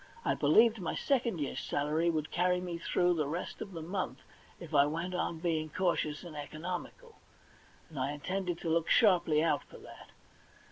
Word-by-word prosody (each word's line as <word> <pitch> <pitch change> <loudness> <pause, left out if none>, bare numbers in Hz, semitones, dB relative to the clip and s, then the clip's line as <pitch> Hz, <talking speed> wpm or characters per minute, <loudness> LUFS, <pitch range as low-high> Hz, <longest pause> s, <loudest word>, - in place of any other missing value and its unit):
I - - +3
believed 215 +9 +4
my 170 - -2
second 240 - 0
year's 145 - -2
salary 155 +4 0
would 160 -1 -2
carry 180 +1 +2
me 175 -2 -5
through 175 +1 +2
the 155 -4 -1
rest 165 +5 -5
of 200 - -6
the 165 -2 -6
month 185 +3 -3 0.4
if 165 -3 -10
I 140 -1 +6
went 170 +4 -3
on 175 -2 -1
being 160 -2 -1
cantious 165 -3 -1
and 170 -3 -9
economical, 175 - -6 0.7
and 155 -4 -8
I 130 +2 0
intended 180 +4 -3
to 165 - -2
look 165 0 +1
sharply 175 -9 +4
out 155 -4 +1
for - - -14
that. - - -13
170 Hz, 180 wpm, -32 LUFS, 155-180 Hz, 0.7 s, I